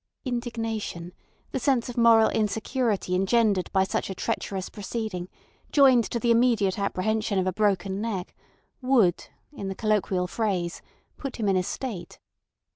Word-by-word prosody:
Indignation, 225 -8 -4 0.4
the - - -2
sense 255 -2 +1
of 245 - -6
moral 230 -2 +6
insecurity 220 -2 -1
engendered 195 0 +2
by 190 -1 +3
such 190 - -2
a 190 - -4
treacherous 190 +1 -3
proceeding 205 -4 -5 0.4
joined 260 -5 +6
to 235 - -3
the 235 0 +2
immediate 230 -5 +3
apprehension 205 +2 0
of 185 - +1
a 185 - 0
broken 195 -1 0
neck, 205 -5 -3 0.5
would, 245 -9 +2 0.3
in 200 -9 -6
the 195 - -4
colloquial 200 -4 0
phrase, 180 -4 -2 0.4
put 275 -2 -5
him 220 -3 -2
in 195 - +3
a 185 - +3
state. 200 0 -5
215 Hz, 145 wpm, -26 LUFS, 190-235 Hz, 0.5 s, moral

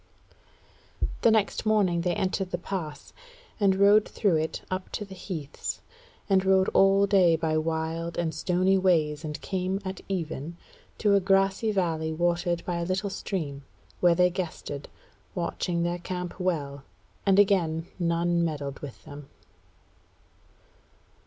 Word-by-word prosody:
The - - +5
next 220 -2 +2
morning 200 -6 +2
they 175 0 0
entered 190 0 -1
the 175 - -2
pass, 175 -4 -6 0.5
and 195 -2 +4
rode 205 +2 +5
through 195 -7 +2
it 160 +1 -3
up 185 0 -3
to 210 - -3
the 195 - -11
heaths, 165 -6 -5 0.5
and 190 -2 +3
rode 190 0 +4
all 195 +1 +5
day 190 -4 +4
by 160 -1 -1
wild 165 +1 -2
and 165 -2 -1
stony 185 +2 +2
ways 160 -5 +2
and 150 -1 -5
came 190 0 -2
at 190 0 -5
even 165 -3 -4 0.4
to 205 -2 +3
a 200 - +6
grassy 195 +3 +2
valley 165 -5 0
watered 175 +1 0
by 175 -1 -2
a 170 - -1
little 190 +3 -1
stream, 145 -9 -4 0.4
where 175 -1 +5
they 180 +1 +4
guested, 160 -5 -5 0.5
watching 170 0 -1
their 175 +1 -1
camp 180 +1 -5
well; 145 -7 -2 0.4
and 195 -1 +3
again 175 -5 +3
none 170 0 +1
meddled 145 -4 -3
with 145 -4 -10
them. 145 -1 -10
175 Hz, 140 wpm, -27 LUFS, 160-195 Hz, 0.5 s, a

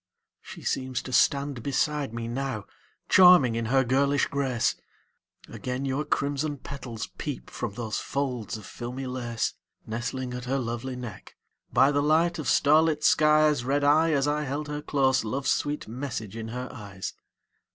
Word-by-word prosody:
She - - -11
seems 130 -1 -2
to 130 - -7
stand 140 -1 +2
beside 145 +1 0
me 115 0 -4
now, 120 -3 -3 0.4
Charming 180 -10 +7
in 115 0 -2
her 135 +4 +3
girlish 140 +3 +2
grace; 135 -4 0 0.7
Again 130 +2 -4
your 135 +3 -1
crimson 145 +1 -1
petals 125 -4 -6
peep 145 -4 -5
From 110 -5 -4
those 110 -2 -3
folds 125 -5 -3
of 105 - -11
filmy 125 +5 -6
lace 120 -3 -2 0.3
Nestling 125 +3 -4
at 125 0 -5
her 135 +2 0
lovely 125 +1 -3
neck. 125 -3 -9 0.4
By 135 +2 +5
the 145 0 +2
light 165 +3 +2
of 150 - -4
starlit 155 +1 +4
skies 150 -3 +4
Read 140 +3 +1
I, 155 +3 +4
as 140 -1 +2
I 150 +1 +1
held 145 +2 -3
her 150 0 -3
close, 135 -3 +2
Love's 130 +5 -1
sweet 145 +1 -1
message 115 -3 -5
in 115 -1 -5
her 125 +2 -5
eyes. 100 -5 -7
135 Hz, 160 wpm, -27 LUFS, 120-145 Hz, 0.7 s, Charming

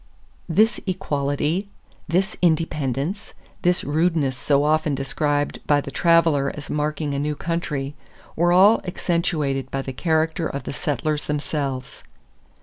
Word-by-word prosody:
This 215 +7 +3
equality, 155 +1 -1 0.4
this 185 +4 +1
independence, 160 - 0 0.3
this 180 0 +2
rudeness 155 -3 +1
so 140 +2 +2
often 155 -1 +2
described 145 +2 -1
by 145 -1 +4
the 140 - -6
traveler 165 -5 +3
as 150 - -7
marking 150 0 -1
a 140 - -1
new 150 +1 -1
country, 150 -4 -3 0.4
were 175 +2 +3
all 195 +5 +6
accentuated 160 -7 -1
by 135 0 -3
the 130 - -5
character 160 +2 0
of 140 - -5
the - - -5
settlers 150 +1 -1
themselves. 145 -3 -3
150 Hz, 130 wpm, -23 LUFS, 140-170 Hz, 0.4 s, all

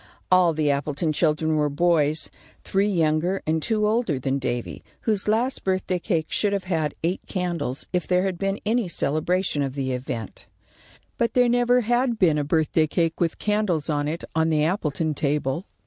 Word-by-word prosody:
All 180 -2 +5
the 150 -2 +2
Appleton 145 +3 -1
children 155 0 +1
were 150 -1 +2
boys, 155 -1 +1 0.3
three 195 +1 +1
younger 170 +1 +1
and 160 +1 0
two 215 +3 0
older 215 - +1
than 135 +1 -1
Davy, 120 -2 -4 0.2
whose 210 -3 -1
last 235 +5 +1
birthday 185 -1 0
cake 165 -4 -1
should 205 -1 +1
have 200 -2 -1
had 160 -5 -1
eight 175 +3 0
candles 175 -8 -3
if 180 -1 0
there 180 0 +2
had 190 -3 -2
been 195 +1 -1
any 225 -1 +1
celebration 155 +1 0
of 135 -1 -2
the 135 -2 -2
event. 125 -4 -5 0.7
But 230 -1 0
there 250 -1 +5
never 245 +1 +3
had 240 +1 +1
been 165 -7 +3
a - - 0
birthday 155 +1 +1
cake 165 0 0
with 170 -2 0
candles 205 -8 0
on 145 -1 0
it 160 +3 -4
on 160 0 +2
the 155 -2 +2
Appleton 160 -3 -1
table. 145 +3 -1
165 Hz, 180 wpm, -24 LUFS, 150-195 Hz, 0.7 s, All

